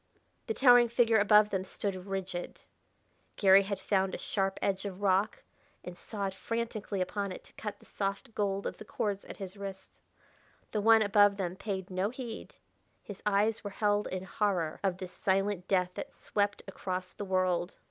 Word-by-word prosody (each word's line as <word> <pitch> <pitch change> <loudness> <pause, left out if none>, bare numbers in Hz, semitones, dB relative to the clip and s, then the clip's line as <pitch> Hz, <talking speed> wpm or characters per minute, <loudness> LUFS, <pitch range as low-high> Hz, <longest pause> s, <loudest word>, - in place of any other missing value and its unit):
The 225 - -1
towering 245 -2 +7
figure 230 -1 +4
above 210 +1 +5
them 190 -1 0
stood 190 0 -4
rigid. 190 -2 -4 0.7
Garry 195 -1 +7
had 200 0 -3
found 190 -2 +1
a - - -4
sharp 195 -1 -1
edge 195 -1 0
of 200 -1 -6
rock, 195 +2 +2 0.4
and 180 - -7
sawed 200 0 -4
frantically 225 -2 -3
upon 200 +2 -2
it - - -8
to - - -17
cut 210 -1 -6
the - - -19
soft 200 +4 -3
gold 200 -1 -1
of - - -3
the - - -9
cords 205 -1 -3
at - - -9
his 195 -1 -7
wrists. 195 -1 -8 0.7
The 210 - 0
one 225 +1 +6
above 205 -1 +5
them 180 -2 -2
paid 190 -1 -4
no 185 +2 0
heed; 240 -2 -7 0.5
his 205 -2 -9
eyes 210 +2 +2
were 205 - -4
held 205 +1 +1
in 185 0 -4
horror 185 -5 -1
of 190 -2 +1
this 185 -1 -7
silent 195 -1 0
death 180 -2 +2
that - - -6
swept 205 -1 -1
across 185 -1 -4
the 205 - -6
world. 185 -2 0
200 Hz, 180 wpm, -31 LUFS, 190-210 Hz, 0.7 s, towering